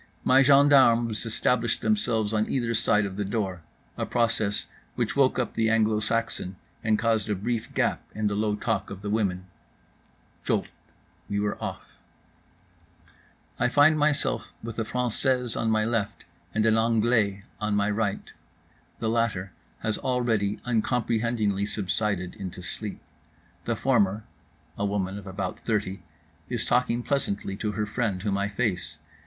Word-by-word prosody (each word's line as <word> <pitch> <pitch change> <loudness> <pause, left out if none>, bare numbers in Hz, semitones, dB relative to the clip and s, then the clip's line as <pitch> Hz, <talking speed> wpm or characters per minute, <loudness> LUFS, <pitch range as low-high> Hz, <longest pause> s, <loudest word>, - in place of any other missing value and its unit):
My 130 +1 +6
gendarmes 130 -5 +5
established 115 +1 +1
themselves 115 - +1
on 110 0 +1
either 120 -3 0
side 110 -2 +2
of 95 -1 -6
the 105 - 0
door, 95 -3 -2 0.4
a - - -1
process 115 -4 0 0.3
which - - -1
woke - - +3
up - - -1
the 110 -1 +1
Anglo 110 -1 +3
Saxon 110 -4 -2 0.3
and 110 -1 +3
caused 110 -2 +1
a 105 - +1
brief 115 +4 -3
gap - - +1
in 110 0 -2
the 105 - +1
low 105 0 0
talk - - -1
of 100 0 -8
the 105 - -2
women. 95 -4 0 1.0
Jolt—we 100 - -4
were 105 0 0
off. - - -7 1.6
I 125 - +3
find 145 +4 +5
myself 150 -1 0
with 115 0 -5
a - - +1
française 125 +1 +1
on 115 - 0
my 110 -1 +2
left 115 -3 -2 0.3
and 110 0 +1
an 110 0 +4
anglais 110 -3 +2 0.2
on 105 -1 0
my 105 0 +2
right. 105 -1 -2 0.6
The 110 - -2
latter 110 -5 0 0.3
has 110 -1 -1
already 115 -5 0
uncomprehendingly 115 -3 0
subsided 100 -2 -1
into 95 -1 -6
sleep. 105 +2 -5 0.6
The 115 - 0
former 110 -4 +2 0.6
(a - - 0
woman 100 -1 -1
of 100 - -12
about 95 -1 -4
thirty) 100 -4 -2 0.5
is - - -1
talking 120 -1 +1
pleasantly 100 -9 -1
to 105 0 -2
her 105 +1 -1
friend, 105 -4 -2
whom 100 -2 0
I 100 +1 0
face. 100 - -2
110 Hz, 150 wpm, -26 LUFS, 100-115 Hz, 1.6 s, My